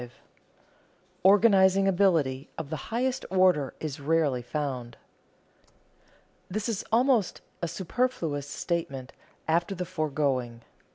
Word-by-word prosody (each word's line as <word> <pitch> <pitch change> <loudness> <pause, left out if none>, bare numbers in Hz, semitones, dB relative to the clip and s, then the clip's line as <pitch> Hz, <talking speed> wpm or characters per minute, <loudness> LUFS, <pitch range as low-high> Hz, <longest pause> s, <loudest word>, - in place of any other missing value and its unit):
Organizing 195 -1 +5
ability 165 -8 +2
of 160 -2 -6
the - - -1
highest 255 +3 -1
order 185 -7 +3
is 155 -2 -5
rarely 145 -3 +1
found. 125 -3 -4 1.5
This 210 +4 -3
is 225 -4 -2
almost 240 -3 +2 0.2
a 170 - -1
superfluous 170 - -2
statement 140 -5 -3 0.3
after 170 +4 +1
the 180 0 -3
foregoing. 140 -8 -2
165 Hz, 100 wpm, -27 LUFS, 140-195 Hz, 1.5 s, Organizing